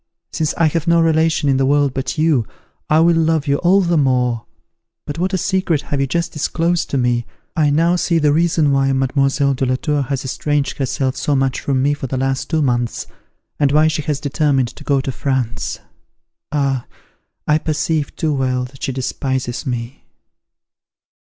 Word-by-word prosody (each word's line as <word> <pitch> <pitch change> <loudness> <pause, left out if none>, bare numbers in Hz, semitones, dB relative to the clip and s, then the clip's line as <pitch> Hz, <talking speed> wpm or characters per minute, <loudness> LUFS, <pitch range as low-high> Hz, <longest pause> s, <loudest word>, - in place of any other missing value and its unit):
since 155 -1 -1
I 165 - +2
have 160 +1 0
no 170 0 +4
relation 160 -2 +2
in 135 -1 +3
the 135 - +2
world 145 -1 +2
but 135 -1 -3
you, 155 -8 +2 0.4
I 155 - +4
will 170 0 +4
love 160 -2 +1
you 140 0 +1
all 185 +5 +3
the 170 -3 +2
more. 125 -4 +1 0.6
But 145 +2 -5
what 185 +2 0
a 190 - 0
secret 185 -5 0
have 140 -1 -2
you 135 - +1
just 170 +4 -1
disclosed 165 +3 -1
to 140 - -1
me! 120 -2 0 0.3
I 155 -2 +3
now 165 +4 +3
see 170 -1 +1
the 150 -2 +3
reason 160 -2 +2
why 135 0 +2
Mademoiselle 135 +1 +1
de 135 - -3
la 130 - +1
Tour 145 +2 -1
has 135 0 -3
estranged 145 +2 -1
herself 130 0 -1
so 145 +1 0
much 135 0 0
from 130 -2 0
me 145 +1 +2
for 145 -2 -5
the 130 - -3
last 135 0 -1
two 160 -2 +1
months, 120 -3 -1 0.5
and 145 -2 +3
why 155 +2 +4
she 155 -1 -1
has 145 -1 -2
determined 145 -3 +1
to 145 - -13
go 140 -2 +1
to 135 - -3
France. 130 -3 -2 0.7
Ah! 135 -4 0 0.6
I 150 +1 +3
perceive 155 -1 -1
too 155 -2 0
well 130 -2 0
that 135 +1 -14
she - - -1
despises 130 -1 -3
me!" 120 +1 -4
140 Hz, 190 wpm, -18 LUFS, 130-155 Hz, 0.7 s, no